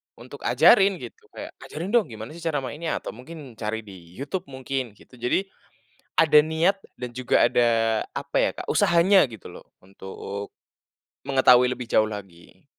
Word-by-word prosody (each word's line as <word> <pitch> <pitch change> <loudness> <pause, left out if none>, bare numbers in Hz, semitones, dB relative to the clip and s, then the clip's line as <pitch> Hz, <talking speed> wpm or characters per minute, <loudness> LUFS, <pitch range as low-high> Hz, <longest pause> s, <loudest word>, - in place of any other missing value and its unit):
untuk - - -12
ajarin 195 0 +5
gitu. 440 - -11
Kayak - - -7
"Ajarin 170 +6 -6
dong 235 -3 +3
gimana 110 +3 -9
sih 170 - -11
cara 155 -5 -2
mainnya?" 155 +6 -4
atau - - -5
mungkin 130 -1 -12
cari 110 0 -3
di 105 - -13 0.2
YouTube 140 +7 -5
mungkin, 130 -4 -5
gitu. 125 +4 -19
Jadi, 125 +10 0 0.8
ada 155 -2 +6
niat 165 +5 +1 0.2
dan 125 - -5
juga 125 -1 +2
ada 115 -2 +2
apa - - -3
ya - - +2
Kak, - - -8
usahanya 190 0 +4
gitu 110 - -11
loh, - - -13 0.2
untuk 100 +1 -8 0.8
mengetahui 125 -2 +5
lebih 125 0 -5
jauh 110 - +4
lagi. 95 -5 -11
130 Hz, 160 wpm, -24 LUFS, 110-165 Hz, 0.8 s, ada